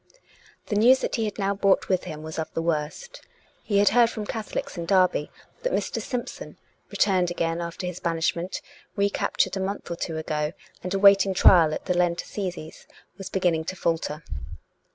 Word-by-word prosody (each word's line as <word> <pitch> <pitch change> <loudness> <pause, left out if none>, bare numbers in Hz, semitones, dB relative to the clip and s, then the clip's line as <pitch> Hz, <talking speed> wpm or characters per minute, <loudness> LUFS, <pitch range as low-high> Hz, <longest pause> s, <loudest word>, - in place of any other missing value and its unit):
The 210 - -3
news 240 +5 +6
that - - -2
he 225 - 0
had 210 - -4
now 200 -1 0
brought 195 -1 +2
with 185 -2 0
him 155 0 -7
was 160 +1 -6
of 160 - -4
the 165 - 0
worst. 165 - -3 0.4
He 205 - 0
had 205 0 +5
heard 235 +1 +5
from 220 -2 -5
Catholics 220 0 -4
in 170 -2 -5
Derby 185 -5 +3 0.3
that - - -1
Mr. - - -1
Simpson, 250 -2 -6 0.3
returned 185 -3 +2
again 170 -1 -1
after 170 +2 -5
his 180 0 -5
banishment, 170 +1 -1 0.3
recaptured 200 -1 0
a - - -2
month 190 -1 -4
or - - -1
two 165 -1 -4
ago, 155 0 -2 0.3
and 180 - -5
awaiting 195 -1 +5
trial 170 -4 +6
at - - -5
the 180 - 0
Lent 175 -1 +1
Assizes, 180 -5 -6 0.3
was 195 - -6
beginning 175 -4 +1
to 185 - -4
falter. 165 -3 -2
180 Hz, 180 wpm, -25 LUFS, 165-200 Hz, 0.4 s, news